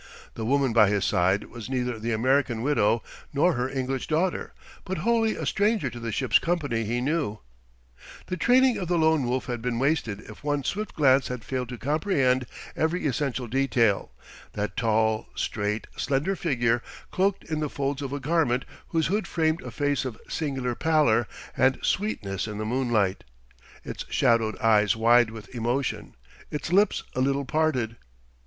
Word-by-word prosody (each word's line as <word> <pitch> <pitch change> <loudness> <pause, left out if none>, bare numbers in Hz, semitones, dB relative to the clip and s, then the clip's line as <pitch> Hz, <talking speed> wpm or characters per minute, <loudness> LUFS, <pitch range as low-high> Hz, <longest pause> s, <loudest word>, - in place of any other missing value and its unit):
The 110 - -5
woman 135 -2 +2
by 110 -3 +6
his 100 -2 +1
side 95 +3 +2
was 120 0 -8
neither 125 -3 -2
the 115 +2 -2
American 120 0 +1
widow 120 -5 +2 0.3
nor 155 +6 +3
her 125 +1 -1
English 130 -1 -3
daughter, 170 +4 0 0.3
but 190 0 -4
wholly 230 -1 +2
a - - -4
stranger 205 - +1
to 120 - -8
the 115 -1 -4
ship's 125 -1 +3
company 145 -10 -1
he 120 +3 -1
knew. 140 -6 -1 0.9
The 185 - -3
training 250 +7 +4
of 180 - -3
the 175 0 +1
Lone 160 -4 +3
Wolf 125 +1 -1
had 120 -2 -4
been 120 0 -1
wasted 125 -6 0
if 105 - -13
one 145 -1 0
swift 210 +9 -3
glance 135 -3 +4
had 125 -3 -5
failed 125 -2 -3
to 125 - -6
comprehend 135 - +1 0.3
every 160 +2 0
essential 130 -2 -1
detail: 120 -4 +1 0.4
that 105 0 -3
tall, 110 -1 +1
straight, 105 +1 -2
slender 145 +8 0
figure 120 -9 +1 0.3
cloaked 195 +1 +1
in 155 -1 -3
the 150 -1 -1
folds 140 0 -2
of 135 -2 -4
a 145 - -3
garment 140 -3 +1 0.2
whose 160 -1 0
hood 205 +5 0
framed 160 0 0
a 125 - -7
face 145 +2 0
of 125 -5 -6
singular 135 -5 -2
pallor 145 -6 +2 0.3
and 130 0 +3
sweetness 105 - -1
in 105 -1 -5
the 110 - -3
moonlight, 115 -5 0 0.6
its - - -6
shadowed 115 -2 +2
eyes 110 -3 +3
wide 120 +1 +5
with 110 -1 -11
emotion, 120 +3 -2 0.3
its 150 +3 -4
lips 200 +1 +3
a 130 - -1
little 140 +1 +1
parted.... 130 -6 0
130 Hz, 170 wpm, -26 LUFS, 115-155 Hz, 0.9 s, by